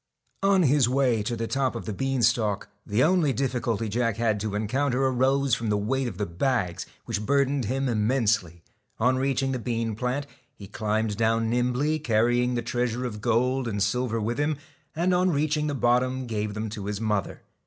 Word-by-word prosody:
On 195 Hz, -1 st, +4 dB
his 140 Hz, -4 st, +4 dB
way 125 Hz, -4 st, +2 dB
to 110 Hz, +3 st, -2 dB
the 115 Hz, 0 st, -3 dB
top 130 Hz, +1 st, -1 dB
of 115 Hz, -, -5 dB
the 110 Hz, -, -3 dB
bean 135 Hz, +3 st, -1 dB
stalk, 110 Hz, -3 st, +1 dB, 0.2 s
the 105 Hz, +4 st, +2 dB
only 170 Hz, -3 st, +3 dB
difficulty 120 Hz, -4 st, -1 dB
Jack 115 Hz, 0 st, 0 dB
had 110 Hz, -2 st, +1 dB
to 105 Hz, 0 st, -3 dB
encounter 130 Hz, +5 st, 0 dB
arose 130 Hz, +1 st, +2 dB
from 115 Hz, 0 st, 0 dB
the 105 Hz, -, +2 dB
weight 130 Hz, +6 st, -1 dB
of 100 Hz, -7 st, -6 dB
the 105 Hz, -, -1 dB
bags, 95 Hz, -1 st, -1 dB, 0.2 s
which 110 Hz, -3 st, -3 dB
burdened 140 Hz, +1 st, +1 dB
him 135 Hz, +4 st, -1 dB
im 110 Hz, -3 st, +1 dB
mensely. 105 Hz, -9 st, 0 dB, 0.3 s
On 125 Hz, +3 st, +2 dB
reaching 135 Hz, 0 st, 0 dB
the 130 Hz, -, -2 dB
bean 115 Hz, -2 st, -2 dB
plant, 125 Hz, +5 st, -2 dB, 0.3 s
he 100 Hz, -, -10 dB
climbed 110 Hz, +1 st, -1 dB
down 115 Hz, 0 st, +1 dB
nimbly, 125 Hz, +6 st, +1 dB
carrying 120 Hz, -1 st, +2 dB
the 120 Hz, -, -1 dB
treasure 120 Hz, +1 st, -1 dB
of 105 Hz, -4 st, -5 dB
gold 125 Hz, +3 st, +1 dB
and 100 Hz, -3 st, 0 dB
silver 115 Hz, +3 st, 0 dB
with 115 Hz, +4 st, -2 dB
him, 145 Hz, 0 st, 0 dB, 0.4 s
and 175 Hz, +3 st, +1 dB
on 180 Hz, +1 st, +3 dB
reaching 150 Hz, -1 st, 0 dB
the 145 Hz, -, -2 dB
bottom 130 Hz, +1 st, +1 dB
gave 105 Hz, -3 st, -3 dB
them 110 Hz, +1 st, -3 dB
to 100 Hz, -1 st, -6 dB
his 105 Hz, -1 st, -3 dB
mother. 105 Hz, -4 st, -2 dB
120 Hz, 195 wpm, -26 LUFS, 110-135 Hz, 0.4 s, On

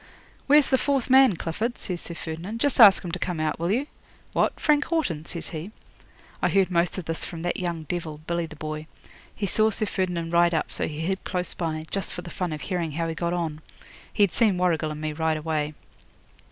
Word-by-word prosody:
'"Where's 290 Hz, +1 st, +7 dB
the 260 Hz, -, +2 dB
fourth 275 Hz, -3 st, 0 dB
man, 260 Hz, -6 st, +7 dB
Clifford?" 210 Hz, +9 st, -3 dB
says 180 Hz, -3 st, -4 dB
Sir 170 Hz, -, -7 dB
Ferdinand. 170 Hz, +8 st, -5 dB
"Just 285 Hz, +1 st, +1 dB
ask 200 Hz, -5 st, +9 dB
him 170 Hz, -, -4 dB
to 180 Hz, -, -3 dB
come 175 Hz, -2 st, -2 dB
out, 155 Hz, -1 st, -1 dB
will 170 Hz, +1 st, -1 dB
you?" 255 Hz, +7 st, +1 dB, 0.5 s
'"What, -, -, +1 dB
Frank 295 Hz, -1 st, +3 dB
Haughton?" 185 Hz, -, -1 dB
says 170 Hz, -, -3 dB
he. 160 Hz, +4 st, -6 dB, 0.7 s
'I -, -, +3 dB
heard 190 Hz, -1 st, +3 dB
most 175 Hz, +1 st, +1 dB
of 185 Hz, -, -4 dB
this 165 Hz, 0 st, -3 dB
from 165 Hz, -1 st, -6 dB
that 175 Hz, -, -1 dB
young 170 Hz, -3 st, -3 dB
devil, 155 Hz, -2 st, -4 dB
Billy 170 Hz, 0 st, -1 dB
the 155 Hz, -, -11 dB
Boy. 155 Hz, 0 st, -5 dB, 0.5 s
He 205 Hz, -, -2 dB
saw 215 Hz, +3 st, +3 dB
Sir 215 Hz, +1 st, -1 dB
Ferdinand 180 Hz, -4 st, -2 dB
ride 170 Hz, 0 st, +4 dB
up, 160 Hz, -, -1 dB
so -, -, +3 dB
he 150 Hz, 0 st, -5 dB
hid 190 Hz, +3 st, -2 dB
close 180 Hz, -1 st, -2 dB
by, 160 Hz, -2 st, -3 dB
just 195 Hz, -, -3 dB
for 180 Hz, -, -6 dB
the 170 Hz, -, -8 dB
fun 180 Hz, -3 st, -3 dB
of 155 Hz, -, -5 dB
hearing 175 Hz, -5 st, -2 dB
how 165 Hz, +2 st, -1 dB
he 165 Hz, -, -2 dB
got 170 Hz, +1 st, -2 dB
on. 160 Hz, -3 st, -2 dB, 0.5 s
He'd 205 Hz, -4 st, +3 dB
seen 210 Hz, -1 st, +3 dB
Warrigal 170 Hz, -3 st, +1 dB
and 150 Hz, 0 st, -6 dB
me 155 Hz, 0 st, -3 dB
ride 160 Hz, 0 st, 0 dB
away. 155 Hz, -1 st, -2 dB
170 Hz, 220 wpm, -25 LUFS, 160-195 Hz, 0.7 s, ask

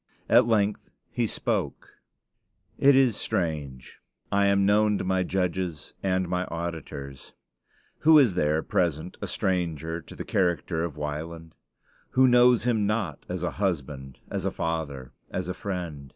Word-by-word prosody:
At 120 Hz, -1 st, +5 dB
length 105 Hz, -2 st, +1 dB, 0.2 s
he -, -, 0 dB
spoke: -, -, -2 dB, 0.9 s
It 140 Hz, 0 st, +6 dB
is 130 Hz, -5 st, +4 dB
strange: 75 Hz, -7 st, -3 dB, 0.3 s
I 100 Hz, 0 st, +3 dB
am 100 Hz, 0 st, +3 dB
known 105 Hz, +1 st, +3 dB
to -, -, -3 dB
my 95 Hz, 0 st, +1 dB
judges 90 Hz, -4 st, -2 dB
and 95 Hz, -1 st, 0 dB
my 90 Hz, +1 st, -1 dB
auditors. 80 Hz, -5 st, -6 dB, 0.7 s
Who 160 Hz, 0 st, +7 dB
is 130 Hz, -10 st, +5 dB
there 80 Hz, -2 st, +1 dB
present 85 Hz, 0 st, -1 dB
a -, -, -3 dB
stranger 85 Hz, -3 st, -2 dB
to 75 Hz, -, -13 dB
the -, -, -6 dB
character 85 Hz, -2 st, 0 dB
of 80 Hz, -4 st, -4 dB
Wieland? 80 Hz, +2 st, -5 dB, 0.6 s
Who 130 Hz, 0 st, +7 dB
knows 125 Hz, -1 st, +5 dB
him 110 Hz, -4 st, +1 dB
not 105 Hz, -8 st, -2 dB
as 90 Hz, -1 st, -3 dB
a 90 Hz, -, -1 dB
husband, 70 Hz, -8 st, -2 dB
as -, -, -2 dB
a -, -, +1 dB
father, 75 Hz, -6 st, -4 dB, 0.2 s
as 90 Hz, -1 st, -3 dB
a 90 Hz, -, -2 dB
friend? 85 Hz, -8 st, -5 dB
90 Hz, 150 wpm, -26 LUFS, 80-100 Hz, 0.9 s, Who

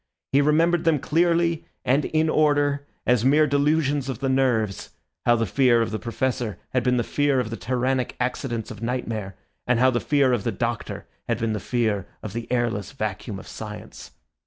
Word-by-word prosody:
He 140 Hz, -, +4 dB
remembered 165 Hz, +3 st, +3 dB
them 165 Hz, -3 st, +3 dB
clearly 170 Hz, +2 st, +1 dB, 0.2 s
and 135 Hz, +4 st, +2 dB
in 160 Hz, 0 st, +1 dB
order 145 Hz, -2 st, +2 dB, 0.2 s
as 125 Hz, -2 st, +3 dB
mere 150 Hz, +4 st, +5 dB
delusions 145 Hz, -1 st, +1 dB
of 130 Hz, -, -3 dB
the 135 Hz, 0 st, -1 dB
nerves—how 115 Hz, -, 0 dB
the 115 Hz, -1 st, 0 dB
fear 120 Hz, +3 st, +3 dB
of 115 Hz, -1 st, 0 dB
the 110 Hz, -, -2 dB
Professor 120 Hz, -2 st, -2 dB
had 125 Hz, -, +1 dB
been 125 Hz, -1 st, +2 dB
the 120 Hz, -, +1 dB
fear 145 Hz, 0 st, +1 dB
of 115 Hz, -3 st, -2 dB
the -, -, -2 dB
tyrannic 125 Hz, +2 st, -1 dB
accidents 125 Hz, -2 st, -2 dB
of 110 Hz, -2 st, -9 dB
nightmare, 115 Hz, -5 st, -3 dB, 0.3 s
and 120 Hz, -1 st, +3 dB
how 130 Hz, +1 st, +5 dB
the 120 Hz, -, 0 dB
fear 140 Hz, -2 st, +2 dB
of 115 Hz, -5 st, 0 dB
the -, -, 0 dB
Doctor -, -, -3 dB, 0.2 s
had 115 Hz, -, 0 dB
been 115 Hz, -1 st, -1 dB
the 105 Hz, -, -2 dB
fear 110 Hz, -3 st, -1 dB, 0.2 s
of 105 Hz, -, -6 dB
the 115 Hz, +1 st, -5 dB
airless 120 Hz, -3 st, -1 dB
vacuum 110 Hz, -3 st, -4 dB
of 95 Hz, -, -11 dB
science. 105 Hz, -1 st, -9 dB
125 Hz, 185 wpm, -24 LUFS, 115-145 Hz, 0.3 s, mere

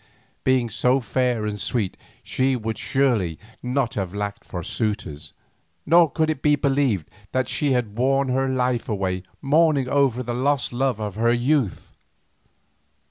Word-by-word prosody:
Being 125 Hz, -3 st, +2 dB
so 125 Hz, +2 st, +2 dB
fair 120 Hz, -1 st, 0 dB
and 105 Hz, -1 st, -3 dB
sweet 110 Hz, -7 st, -1 dB, 0.3 s
she 130 Hz, 0 st, +1 dB
would 110 Hz, -2 st, -4 dB
surely 115 Hz, -, +1 dB, 0.2 s
not 125 Hz, -1 st, -1 dB
have 95 Hz, -2 st, -3 dB
lacked 100 Hz, 0 st, -4 dB
for 90 Hz, -2 st, -6 dB
suitors, 105 Hz, -8 st, -3 dB, 0.5 s
nor 170 Hz, 0 st, +6 dB
could 160 Hz, +2 st, 0 dB
it 145 Hz, -3 st, -5 dB
be 150 Hz, -1 st, +4 dB
believed 135 Hz, -, +1 dB, 0.3 s
that 130 Hz, -1 st, +1 dB
she 145 Hz, -3 st, +1 dB
had 120 Hz, -5 st, -1 dB
worn 135 Hz, +2 st, +2 dB
her 135 Hz, +1 st, +1 dB
life 125 Hz, -2 st, 0 dB
away 95 Hz, -3 st, -1 dB, 0.2 s
mourning 145 Hz, -2 st, +3 dB
over 130 Hz, -3 st, +2 dB
the 120 Hz, 0 st, -3 dB
lost 130 Hz, 0 st, 0 dB
love 130 Hz, -2 st, 0 dB
of 105 Hz, -2 st, -3 dB
her 115 Hz, +1 st, +3 dB
youth. 120 Hz, -, 0 dB
125 Hz, 150 wpm, -23 LUFS, 105-135 Hz, 0.5 s, nor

